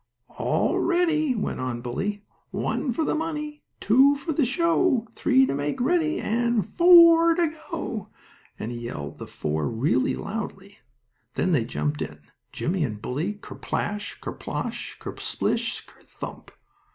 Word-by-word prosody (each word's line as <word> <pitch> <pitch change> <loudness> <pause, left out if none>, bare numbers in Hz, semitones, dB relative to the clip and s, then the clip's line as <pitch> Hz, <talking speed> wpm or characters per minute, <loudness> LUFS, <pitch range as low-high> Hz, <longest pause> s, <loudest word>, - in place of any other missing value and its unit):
"All - - +1
ready," 325 -6 +2
went 210 - -2
on 125 -2 -3
Bully. 200 +12 -3 0.2
"One 265 - -1
for 310 +7 0
the - - +1
money, 300 -2 -3 0.2
two 265 +6 +5
for 285 +4 -4
a 290 -2 +2
show, 330 -2 +2
three 265 -1 +4
to - - -1
make 145 +1 -2
ready 315 +4 +2
and 235 -2 +1
FOUR 335 -1 +7
to 335 -3 +1 0.2
go!" 230 - -4 0.5
and 110 - -4
he 120 - -5
yelled 75 -12 -6
the - - -7
"FOUR" 75 0 -2
real 120 +2 +1 0.2
loudly. 200 -2 -6 0.6
Then 185 - +1
they 130 -9 +2
jumped 150 +4 -2
in, 75 0 -5 0.3
Jimmie 175 0 -1
and 110 -7 -3
Bully, 150 - -2
ker 205 - -11
splash, 205 0 -3
ker - - -5
splosh, - - -4
ker - - -7
splish, - - -1
ker - - -20
thump! - - -9
225 Hz, 150 wpm, -25 LUFS, -, 0.6 s, FOUR